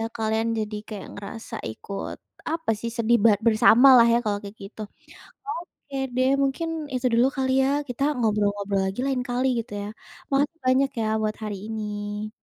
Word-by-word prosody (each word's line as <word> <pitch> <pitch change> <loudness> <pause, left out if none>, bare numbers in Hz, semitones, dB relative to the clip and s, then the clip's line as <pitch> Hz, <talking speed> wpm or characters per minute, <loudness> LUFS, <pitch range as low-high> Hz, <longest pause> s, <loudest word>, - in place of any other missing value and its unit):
kalian 220 0 0
jadi 215 0 -3
kayak 210 -2 -7
ngerasa 205 +3 -8 0.2
ikut 195 - -6 0.3
apa 325 -6 -1
sih, 235 - -3
sedih 235 +1 +3
bar 210 -3 +6
bersamalah 235 +3 +7
ya - - +5
kalau 205 -1 0
kayak 200 +1 -9
gitu. 215 +2 -9 0.7
Oke 335 -7 -7 0.2
deh, 255 +1 +3
mungkin 275 +5 -1 0.3
itu 255 0 0
dulu 240 +3 +5
kali 260 -1 +1
ya 265 - +2 0.2
kita 245 +2 -4 0.2
ngobrol-ngobrol 205 -3 +1
lagi 190 +5 -3
lain 265 -2 0
kali 250 +2 0
gitu 230 0 -10
ya? 205 - -5 0.4
Makasih 285 +4 +1
banyak 265 +2 +3
ya 220 - 0
buat 215 0 -1
hari 210 -2 -3
ini. 210 -1 -4
225 Hz, 165 wpm, -25 LUFS, 210-260 Hz, 0.7 s, bersamalah